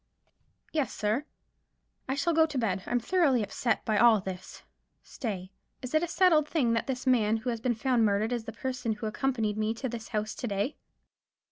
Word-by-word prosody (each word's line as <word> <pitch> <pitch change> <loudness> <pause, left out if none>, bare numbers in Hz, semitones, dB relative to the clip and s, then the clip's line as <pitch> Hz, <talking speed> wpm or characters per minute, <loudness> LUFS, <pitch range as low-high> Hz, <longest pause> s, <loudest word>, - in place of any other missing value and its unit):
"Yes, 295 -7 0
sir." 215 +7 -1 0.8
"I 265 - +1
shall 340 +4 +1
go 320 0 +5
to 300 -3 -5
bed. 200 -6 0
I'm 245 - +1
thoroughly 275 - +2
upset 225 +2 -1
by 215 -2 +2
all 230 -1 +6
this. 185 -1 -8 0.4
Stay. 190 -7 -5 0.3
Is 255 - -6
it 310 - +4
a 345 - -1
settled 330 -3 +4
thing 250 -8 +2
that 230 - -1
this 260 -1 -3
man 225 -4 +3
who 245 +3 -2
has 230 -1 -4
been 245 -1 +1
found 245 0 +2
murdered 215 +2 +1
is 235 -2 -3
the 225 - -5
person 250 0 -3
who 215 +1 -6
accompanied 220 -1 -1
me 215 +1 0
to 260 - -3
this 230 -2 -6
house 215 -1 -2
to 245 - -5
day?" 205 +7 -1
235 Hz, 200 wpm, -29 LUFS, 215-265 Hz, 0.8 s, all